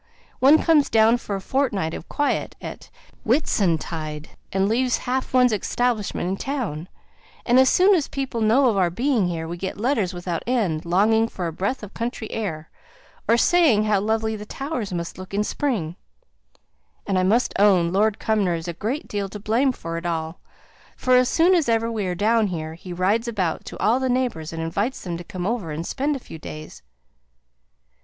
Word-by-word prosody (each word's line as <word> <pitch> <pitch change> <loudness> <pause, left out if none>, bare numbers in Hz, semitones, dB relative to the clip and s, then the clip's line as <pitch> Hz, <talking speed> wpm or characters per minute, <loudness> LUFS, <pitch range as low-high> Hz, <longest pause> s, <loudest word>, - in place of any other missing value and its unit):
One 280 +4 +7
comes 315 -3 +3
down 225 +1 +4
for 210 -4 -5
a - - -3
fortnight 200 - -1
of - - -8
quiet, 290 -1 -1
at - - -9 0.3
Whitsuntide, 165 - 0 0.2
and 195 0 +1
leaves 250 +3 +1
half 255 +1 -1
one's 250 -2 +4
establishment 215 -3 -1
in 190 +1 -2
town, 225 - -3 0.6
and 245 +1 +5
as 260 0 +6
soon 380 +3 +5
as 325 -7 +1
people 265 -4 -3
know 235 +5 +4
of 220 -4 +1
our 180 -2 +3
being 235 - +1
here, 165 -2 -3
we 170 +1 -5
get 190 +2 -5
letters 220 -4 0
without 175 -2 -4
end, 195 -10 0
longing 215 +6 +3
for 185 -5 -5
a 165 - -3
breath 200 - -2
of 210 - -9
country 230 -1 -4
air, 160 -8 -4 0.6
or 230 +2 +4
saying 280 -6 +4
how 210 -2 +2
lovely 220 +2 0
the 210 - -7
Towers 270 -7 -4
must 170 0 -5
look 185 +1 -7
in 210 - +2
spring; 210 - -2 1.1
and 190 -2 +1
I - - +2
must 225 +7 +2
own, 185 -4 +4
Lord 210 +2 +2
Cumnor 205 -6 +1
is 165 +1 -6
a 170 - -3
great 230 - -3
deal 200 -1 -3
to 210 - -8
blame 230 +6 +2
for 165 -8 -5
it 170 - -12
all, 160 0 -3 0.6
for 255 0 +3
as 250 0 +4
soon 345 +3 +4
as 330 -8 +2
ever 230 0 +1
we 210 -4 -2
are 180 - -2
down 220 +3 +2
here, 160 -4 -4
he 175 +2 -10
rides 200 +7 +1
about 190 -8 -2
to - - -8
all 235 +4 +2
the 260 -1 -1
neighbours, 245 -11 -1
and 165 0 -4
invites 200 +10 -2
them 175 -2 -4
to 175 - -8
come 185 -2 -6
over 215 -5 -2
and 160 +3 -4
spend 285 +7 -1
a - - -4
few 160 - -11
days." 155 - -9
210 Hz, 195 wpm, -23 LUFS, 175-245 Hz, 1.1 s, One